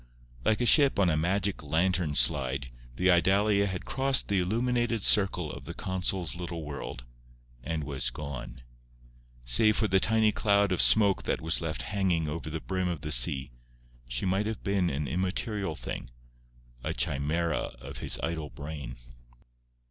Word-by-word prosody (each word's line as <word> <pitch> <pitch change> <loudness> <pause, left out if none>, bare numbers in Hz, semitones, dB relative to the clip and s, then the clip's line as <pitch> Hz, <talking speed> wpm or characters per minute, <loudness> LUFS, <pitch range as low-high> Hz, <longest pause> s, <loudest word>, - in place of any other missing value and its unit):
Like 110 - +1
a - - +2
ship 140 +2 +6
on 95 -4 +3
a - - +1
magic 95 +5 -1
lantern 80 +1 0
slide 65 +1 +1 0.2
the 90 +7 +3
Idalia 100 +3 +3
had 95 -2 -4
crossed 135 +1 +1
the 100 -2 +2
illuminated 115 +3 0
circle 95 -6 +3
of - - -10
the - - -8
consul's 95 -2 -2
little 85 -2 -6
world, 70 -4 -7 0.6
and 80 0 -3
was 70 -3 -2
gone. 65 -2 -8 0.8
Save 110 - +4
for 110 - +2
the 95 -1 +3
tiny 110 +1 +2
cloud 100 -2 +2
of 90 - +3
smoke 100 -3 +6
that - - -1
was 80 +2 0
left 80 -1 -3
hanging 95 -6 0
over 80 +1 -5
the 80 +1 -4
brim 95 -1 -2
of 85 -4 -3
the 75 -1 -5
sea, 65 +1 +3 0.6
she - - -2
might 95 +3 0
have 110 -2 -5
been 100 -3 0
an 70 0 -3
immaterial 95 - -2
thing, - - -7 0.7
a - - -3
chimera 75 +2 -1
of 65 +1 -9
his - - +2
idle 80 -3 -3
brain. 70 -4 -8
90 Hz, 160 wpm, -28 LUFS, 75-100 Hz, 0.8 s, ship